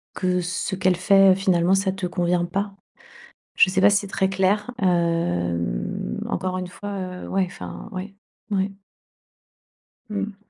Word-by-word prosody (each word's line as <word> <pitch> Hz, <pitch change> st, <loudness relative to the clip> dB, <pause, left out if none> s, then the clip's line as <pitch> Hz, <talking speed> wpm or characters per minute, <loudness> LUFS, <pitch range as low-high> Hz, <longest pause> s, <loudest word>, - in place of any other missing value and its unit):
que 180 Hz, -1 st, +1 dB
ce 180 Hz, +2 st, -2 dB
qu'elle 185 Hz, -1 st, +2 dB
fait 195 Hz, 0 st, +6 dB
finalement 185 Hz, -1 st, +2 dB
ça 195 Hz, 0 st, +1 dB
te 190 Hz, -1 st, -4 dB
convient 175 Hz, -1 st, 0 dB
pas. 195 Hz, +2 st, -3 dB, 0.8 s
Je -, -, +6 dB
sais 190 Hz, -, +1 dB
pas 200 Hz, -, +7 dB
si 200 Hz, -, +5 dB
c'est 200 Hz, -, -7 dB
très 190 Hz, 0 st, 0 dB
clair, 195 Hz, +4 st, +1 dB
hem, 90 Hz, -, 0 dB
encore 185 Hz, 0 st, -2 dB
une 180 Hz, -, -4 dB
fois 185 Hz, -1 st, -6 dB
ouais 195 Hz, -1 st, +1 dB
enfin, 85 Hz, -, -8 dB
ouais, 195 Hz, +2 st, -6 dB, 0.4 s
ouais. 195 Hz, 0 st, +1 dB, 1.4 s
Mmh. 205 Hz, -1 st, -3 dB
185 Hz, 145 wpm, -23 LUFS, 175-195 Hz, 1.4 s, pas